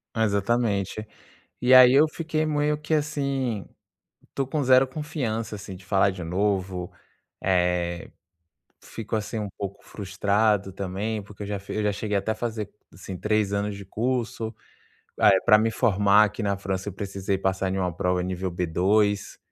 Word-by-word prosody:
Exatamente. 110 Hz, -1 st, 0 dB, 0.5 s
E, 125 Hz, +1 st, +4 dB
aí, 130 Hz, 0 st, +9 dB
eu 150 Hz, +3 st, +6 dB
fiquei 155 Hz, 0 st, -2 dB
meio 150 Hz, 0 st, +1 dB
que 155 Hz, +1 st, -3 dB
assim, 140 Hz, -7 st, -1 dB, 0.6 s
estou 135 Hz, -1 st, -3 dB
com 145 Hz, +2 st, -1 dB
zero 130 Hz, 0 st, +5 dB
confiança, 130 Hz, -7 st, -3 dB
assim, 95 Hz, -2 st, -8 dB
de 90 Hz, -, -15 dB
falar 95 Hz, 0 st, +3 dB
de 95 Hz, -2 st, -7 dB
novo, 95 Hz, 0 st, -1 dB, 0.5 s
eh, 90 Hz, -2 st, 0 dB, 0.7 s
fico, 115 Hz, 0 st, -5 dB
assim, 110 Hz, +1 st, -3 dB
um 105 Hz, -1 st, -3 dB
pouco 100 Hz, 0 st, -6 dB
frustrado, 100 Hz, 0 st, 0 dB
também, 100 Hz, +3 st, -3 dB
porque 105 Hz, 0 st, -10 dB
eu -, -, -6 dB
já 100 Hz, -1 st, -3 dB
fi 100 Hz, -, -8 dB
eu 110 Hz, -, 0 dB
já 105 Hz, -, +2 dB
cheguei 105 Hz, 0 st, -2 dB
até 100 Hz, +3 st, -1 dB
a -, -, -2 dB
fazer, 110 Hz, -2 st, -4 dB, 0.2 s
assim, 95 Hz, -2 st, -8 dB
3 105 Hz, -1 st, 0 dB
anos 100 Hz, 0 st, -1 dB
de 100 Hz, 0 st, -9 dB
curso. 115 Hz, +1 st, -2 dB, 0.7 s
Eh, 95 Hz, -, +6 dB
pra 105 Hz, -, +7 dB
me 110 Hz, +1 st, +1 dB
formar 105 Hz, -2 st, +4 dB
aqui 105 Hz, +2 st, -5 dB
na 100 Hz, -1 st, 0 dB
França, 95 Hz, 0 st, -3 dB
eu -, -, -9 dB
precisei 95 Hz, -1 st, -3 dB
passar 95 Hz, 0 st, -1 dB
numa 90 Hz, -3 st, -1 dB
prova 90 Hz, +1 st, 0 dB
nível 95 Hz, 0 st, -3 dB
B2, 95 Hz, +4 st, +1 dB
105 Hz, 165 wpm, -25 LUFS, 95-115 Hz, 0.7 s, aí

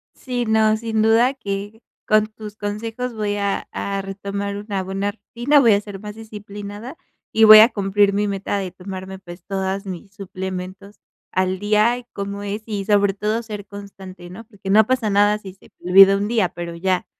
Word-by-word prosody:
Sí, 245 Hz, -2 st, -3 dB
no, 220 Hz, -1 st, +3 dB
sin 220 Hz, -1 st, -1 dB
duda 225 Hz, +4 st, +4 dB
que 205 Hz, -2 st, -6 dB, 0.2 s
con 215 Hz, 0 st, +3 dB
tus 215 Hz, -1 st, -10 dB
consejos 225 Hz, +4 st, -4 dB
voy 210 Hz, -2 st, -2 dB
a 200 Hz, -1 st, -2 dB
a 200 Hz, 0 st, -3 dB
retomar 200 Hz, +1 st, -5 dB
una 205 Hz, -1 st, -3 dB
buena 195 Hz, +2 st, -2 dB
rutina, 240 Hz, +7 st, +1 dB
voy 235 Hz, -5 st, +5 dB
a 200 Hz, -, +2 dB
ser 205 Hz, -2 st, -9 dB
más 210 Hz, +1 st, -8 dB
disciplinada, 210 Hz, +2 st, -9 dB, 0.4 s
y 225 Hz, -, +4 dB
voy 215 Hz, 0 st, +11 dB
a 220 Hz, +2 st, +8 dB
cumplir 200 Hz, -2 st, +1 dB
mi 205 Hz, +1 st, 0 dB
meta 200 Hz, 0 st, -2 dB
de 190 Hz, -2 st, -4 dB
tomarme, 190 Hz, +1 st, -8 dB
pues, 175 Hz, -1 st, -12 dB
todas 195 Hz, 0 st, -3 dB
mis 190 Hz, +1 st, -8 dB
suplementos 190 Hz, 0 st, -7 dB, 0.3 s
al 185 Hz, 0 st, 0 dB
día. 210 Hz, +4 st, +2 dB
Y 245 Hz, -, -11 dB
cómo 200 Hz, 0 st, -5 dB
es, 205 Hz, +2 st, -4 dB
y 205 Hz, -3 st, -4 dB
sobre 205 Hz, -1 st, +3 dB
todo 215 Hz, +3 st, -2 dB
ser 210 Hz, -3 st, -7 dB
constante, 195 Hz, -3 st, -11 dB
¿no?, 185 Hz, +6 st, -10 dB
porque 205 Hz, -3 st, -10 dB
no 215 Hz, +2 st, +5 dB
pasa 255 Hz, -4 st, 0 dB
nada 205 Hz, +1 st, +3 dB
si 195 Hz, -3 st, -11 dB
se 190 Hz, -, -21 dB
me 180 Hz, -, -6 dB
olvida 195 Hz, +1 st, +8 dB
1 200 Hz, +1 st, -2 dB
día, 220 Hz, -5 st, +1 dB
pero 170 Hz, 0 st, -7 dB
ya, 185 Hz, +1 st, 0 dB
205 Hz, 190 wpm, -21 LUFS, 195-215 Hz, 0.4 s, voy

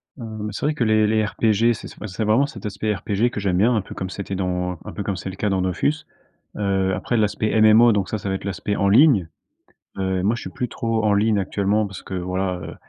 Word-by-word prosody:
Hem, 110 Hz, -4 st, -6 dB
c'est 105 Hz, -, -4 dB
vrai 150 Hz, -, +2 dB
que 140 Hz, -, -1 dB
les 110 Hz, -1 st, +3 dB
les 110 Hz, 0 st, +2 dB
RPG, 110 Hz, +2 st, +2 dB
c'est, -, -, -8 dB
bah, 110 Hz, -, -5 dB
c'est 100 Hz, +3 st, -4 dB
vraiment 110 Hz, +6 st, +3 dB
cet 115 Hz, -8 st, -9 dB
aspect 105 Hz, +1 st, -2 dB
RPG 105 Hz, +3 st, 0 dB
que -, -, -4 dB
j'aime 95 Hz, -3 st, 0 dB
bien, 115 Hz, +6 st, +3 dB
un 110 Hz, -, +1 dB
peu -, -, -10 dB
comme 95 Hz, -, -4 dB
c'était 100 Hz, 0 st, -5 dB
dans, 90 Hz, -1 st, -2 dB
un -, -, -6 dB
peu 100 Hz, -, -4 dB
comme 100 Hz, -, -2 dB
c'est 90 Hz, +2 st, -5 dB
le 95 Hz, -, -7 dB
cas 105 Hz, -, -1 dB
dans 95 Hz, -1 st, 0 dB
Dofus. 95 Hz, -, +1 dB, 0.6 s
Heu, 95 Hz, -2 st, 0 dB
après 120 Hz, -, -2 dB
l'aspect 110 Hz, 0 st, +1 dB
MMO, 110 Hz, +2 st, +7 dB
donc 100 Hz, -3 st, 0 dB
ça, 110 Hz, -, -2 dB
ça 100 Hz, -, -5 dB
va 95 Hz, -, 0 dB
être 95 Hz, -, -5 dB
l'aspect 100 Hz, +1 st, -2 dB
en 100 Hz, -, +2 dB
ligne, 110 Hz, -, +5 dB, 0.7 s
heu, 95 Hz, -1 st, -1 dB
et 90 Hz, -, -2 dB
moi, 110 Hz, +4 st, +2 dB
je -, -, -7 dB
suis -, -, -6 dB
plus 125 Hz, -, -3 dB
trop 115 Hz, -1 st, -1 dB
en 105 Hz, -1 st, +3 dB
ligne 105 Hz, +1 st, +2 dB
actuellement 100 Hz, +2 st, 0 dB
parce 95 Hz, -2 st, -9 dB
que, -, -, -8 dB
voilà, 90 Hz, +1 st, -2 dB
heu, -, -, -8 dB
105 Hz, 260 wpm, -22 LUFS, 95-110 Hz, 0.7 s, MMO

